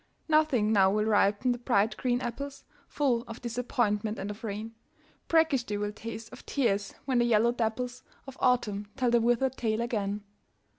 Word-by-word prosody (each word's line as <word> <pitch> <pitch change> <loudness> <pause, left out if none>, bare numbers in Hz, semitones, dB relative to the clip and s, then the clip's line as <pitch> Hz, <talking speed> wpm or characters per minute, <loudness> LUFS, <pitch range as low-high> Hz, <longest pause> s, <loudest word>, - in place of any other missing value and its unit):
Nothing 305 -9 +3
now 195 -2 +5
will 210 +2 +1
ripen 210 +3 +3
the 245 - -2
bright 220 -3 +2
green 245 -1 0
apples, 275 +4 -5 0.2
Full 260 -5 +1
of 230 +1 -8
disappointment 225 -3 -1
and 200 +2 -4
of 210 - -11
rain, 220 +1 -5 0.5
Brackish 320 -6 +3
they 205 -2 -3
will 205 0 -2
taste, 225 +1 -8
of 255 - -11
tears, 205 -7 0
when 260 -3 +2
the 240 - +3
yellow 235 0 +4
dapples 245 +2 -2 0.2
Of 270 -1 -9
Autumn 210 -5 +1
tell 250 -2 +2
the 235 -1 +4
withered 240 +3 +1
tale 220 -2 0
again. 210 -3 -2
230 Hz, 170 wpm, -29 LUFS, 210-250 Hz, 0.5 s, now